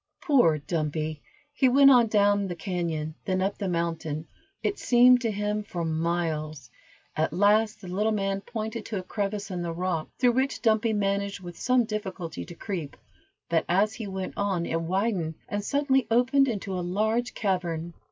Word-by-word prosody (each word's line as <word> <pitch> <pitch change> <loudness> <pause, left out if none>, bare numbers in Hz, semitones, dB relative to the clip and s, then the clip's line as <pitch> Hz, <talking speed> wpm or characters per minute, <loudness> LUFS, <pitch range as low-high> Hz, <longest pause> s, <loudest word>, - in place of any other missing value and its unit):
Poor 250 - +4
Dumpy! 155 0 -3 0.3
He 270 -3 +3
went 275 +2 +7
on, 245 -3 +6
down 205 -2 +3
the 175 - -4
cañon, 165 -3 -3
then 185 -1 0
up 195 +2 -1
the 200 - -2
mountain, 165 -3 -2 0.4
it 405 - -1
seemed 245 0 +6
to 230 - 0
him 210 0 -1
for 175 -5 -4
miles; 160 -3 -2 0.4
at 155 +1 0
last 210 +2 +3
the 185 - -9
little 205 +5 0
man 195 -2 -1
pointed 220 +1 -5
to 215 - -4
a 185 - -4
crevice 200 +1 -3
in 180 -1 -3
the 170 -1 -3
rock, 170 -2 -2
through 250 -1 +4
which 265 +3 -1
Dumpy 225 0 +3
managed 200 -1 -1
with 175 -2 -8
some 250 +4 +2
difficulty 195 -6 -5
to 175 - -10
creep; 170 -7 -5 0.5
but 165 -1 +1
as 200 +5 +3
he 220 -3 -6
went 190 -1 -4
on 195 -4 0
it 165 0 -1
widened, 180 -2 -1
and 205 0 -3
suddenly 270 +1 +1
opened 255 +4 +4
into 200 -5 -3
a 180 - -2
large 220 +7 0
cavern. 175 -4 -2
195 Hz, 175 wpm, -27 LUFS, 170-220 Hz, 0.5 s, went